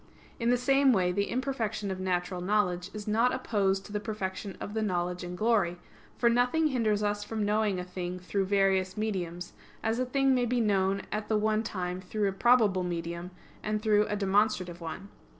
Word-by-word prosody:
In 235 0 +1
the 245 - +4
same 270 +2 +4
way, 180 -4 +2
the 200 +2 -1
imperfection 225 -6 -2
of 185 - -4
natural 180 -1 -1
knowledge 180 -2 0
is 210 0 -7
not 230 +4 +3
opposed 195 -6 0
to - - -11
the 210 - -1
perfection 200 -2 -5
of 205 - -6
the 220 - -1
knowledge 180 -3 -1
in 175 0 -5
glory; 205 -4 +1 0.4
for 240 - +3
nothing 250 +7 +3
hinders 215 -6 +1
us 205 0 0
from 215 0 -2
knowing 210 -2 +1
a - - -3
thing 180 0 -5
through 190 +2 -1
various 190 -1 +2
mediums, 180 -5 -3 0.3
as 225 +2 0
a 255 - +1
thing 270 +1 +3
may 245 -1 +2
be 245 +1 +1
known 195 -3 +1
at 210 0 -3
the 215 - +2
one 215 0 +1
time 180 -4 -4
through 205 +2 -1
a - - +1
probable 215 -3 +4
medium 170 0 -4 0.3
and 215 0 -2
through 210 -1 +3
a 210 - -1
demonstrative 195 -3 +1
one. 170 +4 -6
205 Hz, 195 wpm, -29 LUFS, 185-220 Hz, 0.4 s, the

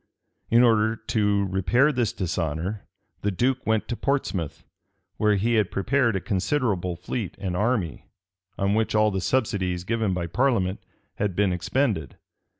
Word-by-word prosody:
In 120 +1 +5
order 110 -2 +3
to 105 -3 0
repair 95 - +2
this 120 -7 0
dishonor, 85 +3 -3 0.3
the 105 - 0
duke 125 +7 0
went 110 -1 +1
to 120 - -1
Portsmouth, 100 - -2 0.5
where 105 -1 +3
he 110 +5 +1
had 110 -4 +2
prepared 115 +2 +1
a - - +1
considerable 95 -3 -1
fleet 100 +3 -4
and 90 -2 -3
army, 105 - -1 0.5
on 100 +1 +1
which 110 0 +1
all 105 0 +4
the 95 -1 -2
subsidies 95 -7 0
given 110 0 0
by 85 -1 -2
parliament 100 -1 +1 0.4
had 100 -4 -1
been 100 -2 +2
expended. 90 - -1
105 Hz, 150 wpm, -25 LUFS, 90-115 Hz, 0.5 s, In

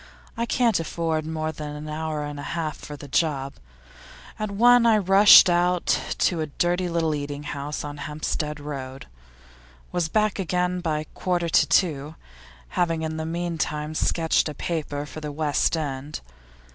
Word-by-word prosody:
I 235 +1 -2
can't 230 -5 +2
afford 160 -1 -2
more 155 0 -2
than 150 -1 -7
an 150 +1 -7
hour 155 0 -3
and 145 -1 -6
a 145 - -5
half 155 -2 -2
for 150 - -8
that 145 -1 -11
job. 140 -4 0 0.8
At 215 -1 -2
one, 240 +4 +5
I 220 -2 +5
rushed 195 +1 +8
out 175 0 +2 0.3
to 170 -3 +1
a 155 - -2
dirty 175 +4 0
little 165 -2 0
eating 145 0 -4
house 145 0 -5
in 145 0 -6
Hampstead 150 +1 -3
Road. 135 -3 -7 0.9
Was 170 -2 -1
back 215 +1 +1
again 180 0 0
by 155 -3 -1
a - - -8
quarter 175 +1 -2
to - - +4
two, 155 -4 +1 0.5
having 165 -2 0
in 160 0 -3
the 160 0 -3
meantime 160 -3 -2
sketched 160 0 +1
a 150 - -7
paper 145 -2 -3
for 155 - -9
The 150 -1 -5
West 150 +2 +1
End. 140 - -4
160 Hz, 165 wpm, -24 LUFS, 150-175 Hz, 0.9 s, rushed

